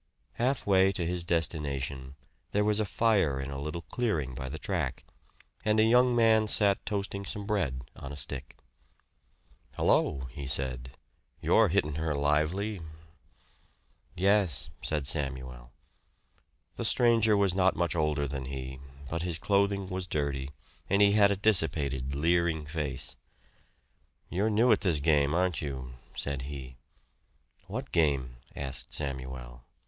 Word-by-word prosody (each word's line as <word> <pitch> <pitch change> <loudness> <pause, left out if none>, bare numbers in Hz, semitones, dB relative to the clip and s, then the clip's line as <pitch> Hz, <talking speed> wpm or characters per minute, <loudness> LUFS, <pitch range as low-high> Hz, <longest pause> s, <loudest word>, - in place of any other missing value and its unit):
Halfway 100 -7 +2
to 90 -2 -2
his 90 0 -2
destination 70 -5 -2 0.4
there 105 - +3
was 105 0 +2
a 110 - +1
fire 95 -11 +2
in 70 +1 -5
a 70 0 -5
little 75 +3 -5
clearing 85 - -1
by 65 0 -5
the 75 - -5
track, 80 -6 -3 0.6
and 110 0 +2
a - - +6
young 125 +2 +4
man 110 -2 +4
sat 100 -2 +3
toasting 100 -2 -2
some 100 +1 -3
bread 85 - -1
on 70 - -8
a 70 - -7
stick. 70 -2 -4 1.2
"Hello!" 70 - +2
he 70 +1 -6
said. 65 -1 -2 0.4
"You're - - +4
hittin' 75 0 0
her 80 -2 -1
lively." 75 +8 0 1.3
"Yes," 95 -5 +2
said 75 -3 -2
Samuel. 65 -4 -3 1.1
The - - -3
stranger 115 -3 +4
was 100 -3 +2
not 95 0 +3
much 85 0 0
older 75 -3 0
than 70 -1 -5
he, 65 0 -6 0.3
but 85 +4 -3
his 85 -2 -2
clothing 100 0 +1
was 95 -1 -4
dirty 70 -4 -2 0.4
and 100 - +3
he 100 0 +6
had 100 -1 +5
a 100 - +1
dissipated, 75 -10 +2
leering 80 0 +1
face. 75 -5 -4 1.1
"You're 100 +5 0
new 115 +3 +4
at 105 - +4
this 85 -6 +2
game, 75 0 +2
aren't 90 -3 +1
you?" 65 -4 -5 0.2
said 70 -2 -3
he. 65 -4 -8 0.9
"What - - -5
game?" 70 -6 +1 0.2
asked 70 -2 -5
Samuel. 65 -4 -4
80 Hz, 140 wpm, -29 LUFS, 70-100 Hz, 1.3 s, a